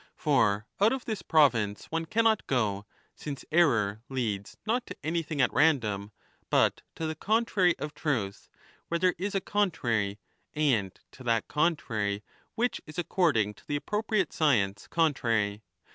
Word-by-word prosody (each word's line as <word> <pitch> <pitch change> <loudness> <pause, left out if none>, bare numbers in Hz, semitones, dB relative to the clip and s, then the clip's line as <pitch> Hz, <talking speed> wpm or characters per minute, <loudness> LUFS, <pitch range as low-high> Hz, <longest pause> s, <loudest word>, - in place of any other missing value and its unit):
For 110 -8 +2
out 210 +4 +4
of 265 -2 -4
this 215 -5 -3
province 120 -12 +2
one 165 0 -1
cannot 225 +2 +2
go, 105 -6 0 0.3
since 140 -3 -7
error 110 -11 +3
leads 110 -7 -3
not 235 +3 0
to - - -8
anything 160 -1 -2
at 125 - +2
random 110 -10 +2 0.4
but - - +3
to 165 - -4
the 160 - -1
contrary 200 0 +2
of 150 -1 -5
truth 110 -10 -2 0.4
where 170 - 0
there 180 +1 +3
is 200 +2 -2
a - - +3
con 205 +1 +1
35 170 - -16
trary, 100 -3 0 0.4
and 125 -11 +1
to 130 - -13
that 115 -2 +1
contrary 110 -11 0 0.3
which 245 +2 0
is 155 - -10
according 155 - +1
to - - -22
the 145 0 -1
appro 210 +7 -2
priate 210 -6 0
science 105 -10 +1
contrary. 115 -10 +1
145 Hz, 160 wpm, -29 LUFS, 105-175 Hz, 0.4 s, out